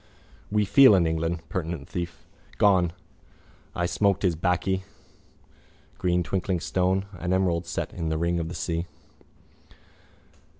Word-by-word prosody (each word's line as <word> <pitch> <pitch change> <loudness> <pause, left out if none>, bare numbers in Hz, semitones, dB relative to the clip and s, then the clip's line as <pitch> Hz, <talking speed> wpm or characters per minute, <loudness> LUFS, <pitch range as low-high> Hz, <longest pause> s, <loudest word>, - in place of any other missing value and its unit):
We 105 0 +2
feel 105 +3 +7
in 90 -3 +3
England. 80 +1 -2
Penitent 80 -5 -4
thief. 85 -1 -6 0.3
Gone. 95 -4 +4 0.8
I 85 - 0
smoked 100 +2 +1
his 90 -4 +2
baccy. 95 +2 0 1.2
Green 90 -1 +1
twinkling 95 0 -1
stone. 95 +3 0
An 90 +1 -1
emerald 90 -2 +1
set - - -4
in 80 -2 -3
the 80 - -1
ring 85 +1 0
of 80 -1 -3
the 90 - -6
sea. 85 0 -2
90 Hz, 130 wpm, -26 LUFS, 85-95 Hz, 1.2 s, feel